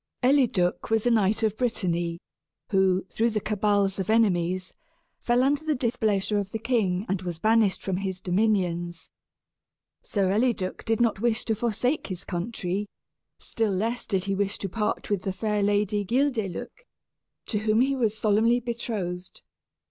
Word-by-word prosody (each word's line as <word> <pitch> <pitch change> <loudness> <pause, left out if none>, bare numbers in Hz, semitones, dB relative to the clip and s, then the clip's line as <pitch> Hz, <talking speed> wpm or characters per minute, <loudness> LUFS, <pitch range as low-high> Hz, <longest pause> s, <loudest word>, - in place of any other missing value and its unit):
_) - - +5
Eliduc 240 -12 +2
was 225 0 +1
a 245 - +4
knight 220 0 +2
of 215 -1 +1
Brittany 175 -8 -1 0.5
who, 190 -1 +2
through 230 +2 +1
the 215 -1 -1
cabals 205 -2 +1
of 190 - -3
enemies, 185 -5 +1 0.5
fell 245 +1 +2
under 285 +3 +1
the 310 -1 0
displeasure 215 -5 0
of 200 -1 -4
the 225 - -3
king 215 -5 0
and 195 -1 -1
was 175 -3 -4
banished 215 +1 +2
from 190 -2 -1
his 190 -1 -3
dominions. 180 -3 -1 0.9
Sir 195 -3 0
Eliduc 210 -3 0
did 225 -1 +1
not 230 -4 +2
wish 235 0 +1
to 225 - +1
forsake 240 +6 -1
his 185 -3 -6
country, 195 +1 -3 0.5
still 220 -3 -2
less 225 +6 -2
did 190 -4 0
he 195 0 -1
wish 200 +1 -1
to 195 - -4
part 210 +2 -2
with 200 -3 +1
the 190 - -2
fair 210 +2 -1
Lady 205 0 +1
Guildeluec, 245 - -2 0.6
to 210 - -1
whom 215 +2 +2
he 275 +2 +2
was 225 -4 0
solemnly 220 +3 +3
betrothed. 215 -7 -5
210 Hz, 160 wpm, -26 LUFS, 190-230 Hz, 0.9 s, _)